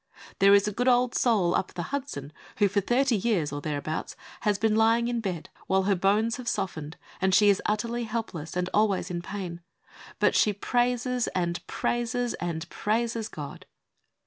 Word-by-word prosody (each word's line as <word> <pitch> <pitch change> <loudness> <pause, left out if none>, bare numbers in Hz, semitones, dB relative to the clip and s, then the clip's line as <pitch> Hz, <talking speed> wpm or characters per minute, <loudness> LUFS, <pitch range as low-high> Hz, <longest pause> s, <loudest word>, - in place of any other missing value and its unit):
There 200 +1 +7
is 200 +1 +3
a - - 0
good 245 +5 -1
old 250 0 +4
soul 200 -8 +2
up - - -1
the 175 - -3
Hudson 155 - -4 0.2
who 205 - +4
for 200 +1 +1
thirty 250 +4 +2
years 190 -8 0
or 145 - -4
thereabout 150 +1 -3 0.2
has 210 -3 +1
been 220 0 +2
lying 225 +2 +3
in 240 -1 -1
bed, 180 -6 -4 0.2
while 190 0 +2
her 200 +1 +2
bones 205 +5 +2
have 250 -2 -8
softened, 160 -6 -3 0.2
and 190 0 +3
she 210 0 +6
is 200 - +3
utterly 230 +3 -1
helpless 200 -9 -4
and 180 0 0
always 200 -4 +2
in 175 -1 -3
pain, 180 -2 -6 0.6
but - - +3
she 210 - +3
praises 245 +3 0
and 175 -1 -1
praises 240 0 -1
and 170 -1 -3
praises 225 +1 -1
God. 145 -2 -8
205 Hz, 175 wpm, -27 LUFS, 180-235 Hz, 0.6 s, There